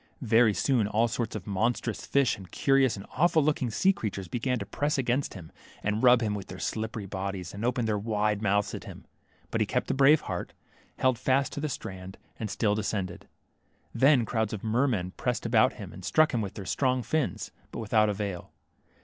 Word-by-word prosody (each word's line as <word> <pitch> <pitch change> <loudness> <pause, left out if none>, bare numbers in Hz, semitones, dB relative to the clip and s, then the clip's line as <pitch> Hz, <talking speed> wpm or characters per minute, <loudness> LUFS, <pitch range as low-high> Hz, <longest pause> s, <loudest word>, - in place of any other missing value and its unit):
Yery 115 -2 +4
soon 125 -7 +2
all 110 +3 +2
sorts 115 0 -3
of 105 - -5
monstrous 110 +3 -1
fish, 140 -3 +2
and 95 -3 -12
curious 135 -3 +3
and 100 - -8
awful 165 -2 +4
looking 145 -4 +1
sea 190 - +3
creatures 100 - -4
began 125 +6 -1
to - - -5
press 145 +1 -1
against 130 0 0
him, 85 -4 -10 0.3
and 105 +1 0
rub 125 -1 +6
him 105 -2 0
with 100 -2 -5
their 90 - -8
slippery 110 +3 -3
bodies, 95 -2 -5
and 100 +2 -6
open 120 0 0
their 105 -2 0
wide 105 -1 0
mouths 100 -1 +1
at - - -6
him. - - -10 0.5
But - - 0
he - - +2
kept - - -1
a - - +1
brave 140 +3 +5
heart, - - -5 0.4
held 130 -3 +2
fast 135 +1 +1
to - - -4
the 150 +1 -2
strand, 95 -6 -7 0.2
and 110 - -3
still 105 +1 +1
descended. 100 -4 -3 0.7
Then 135 -3 +4
crowds 110 -1 -1
of 105 - -5
mermen 110 -5 +1
pressed 125 -2 -2
about 115 -1 +4
him, 100 -4 -9
and 95 - -11
struck 155 - +3
him 120 - +1
with 100 -2 -5
their 100 - -7
strong 130 +5 +1
fins, 155 0 -2 0.2
but - - -7
with 110 0 -6
out 110 -1 +5
avail. 100 -3 -4
110 Hz, 205 wpm, -28 LUFS, 100-130 Hz, 0.7 s, rub